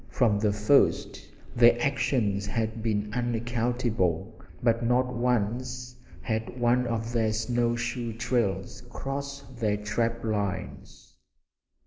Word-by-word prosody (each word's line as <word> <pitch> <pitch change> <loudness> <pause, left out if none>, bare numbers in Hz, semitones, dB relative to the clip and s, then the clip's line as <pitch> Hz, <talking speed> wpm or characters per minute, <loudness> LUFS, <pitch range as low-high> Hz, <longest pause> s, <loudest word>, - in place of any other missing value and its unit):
From 110 -5 +2
the 105 -1 +2
first 105 +7 +2 0.3
their 120 0 +6
actions 120 -7 0
had 110 +1 -2
been 105 -2 -1
unaccountable, 115 -5 -1 0.3
but 115 0 +2
not 125 +2 +2
once 125 +1 -1 0.3
had 110 +2 -3
one 120 +1 +3
of 115 0 -2
their 110 -2 +2
snow 120 +2 0
shoe 120 0 -3
trails 115 -2 -1
crossed 140 0 -6
their 105 -3 +1
trap 115 +3 -1
lines. 100 -3 -4
115 Hz, 110 wpm, -27 LUFS, 110-125 Hz, 0.3 s, their